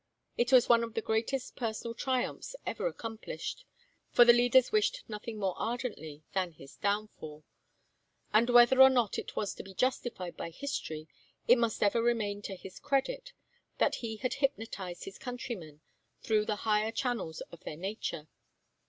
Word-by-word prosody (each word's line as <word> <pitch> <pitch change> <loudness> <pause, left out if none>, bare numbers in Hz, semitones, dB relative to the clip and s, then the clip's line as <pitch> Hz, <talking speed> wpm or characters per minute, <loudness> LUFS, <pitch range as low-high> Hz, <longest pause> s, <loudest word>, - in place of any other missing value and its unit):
It 240 +1 +1
was 255 -2 +7
one 235 -1 +5
of 230 -1 -6
the 225 - 0
greatest 230 +4 -1
personal 230 -1 -3
triumphs 255 - -2
ever - - -1
accomplished 225 - -6 0.4
for 240 - +7
the 240 - +9
leaders 245 +1 +4
wished 430 +4 +1
nothing 215 +1 -6
more 195 -3 0
ardently 220 - -4
than 185 -3 -1
his 135 -2 -14
downfall 200 -7 -3 0.9
and 230 +3 +5
whether 245 +2 +7
or 265 - +11
not 245 -6 +1
it - - -7
was 205 - -1
to - - -8
be 190 -1 -12
justified 240 -8 -1
by - - -5
history, 160 - -5 0.4
it 245 0 +7
must 230 -2 +1
ever 210 +3 +3
remain 220 -4 0
to 195 -1 -5
his 185 0 -11
credit - - -1 0.4
that - - +3
he 225 -2 -3
had 255 +3 -2
hypnotized 225 -10 -2
his 195 - -9
countrymen 230 - -6 0.4
through 215 -1 +2
the 215 - 0
higher 215 0 +2
channels 230 -11 -2
of 170 - -11
their 150 - -6
nature. 185 -4 -4
225 Hz, 160 wpm, -31 LUFS, 195-250 Hz, 0.9 s, or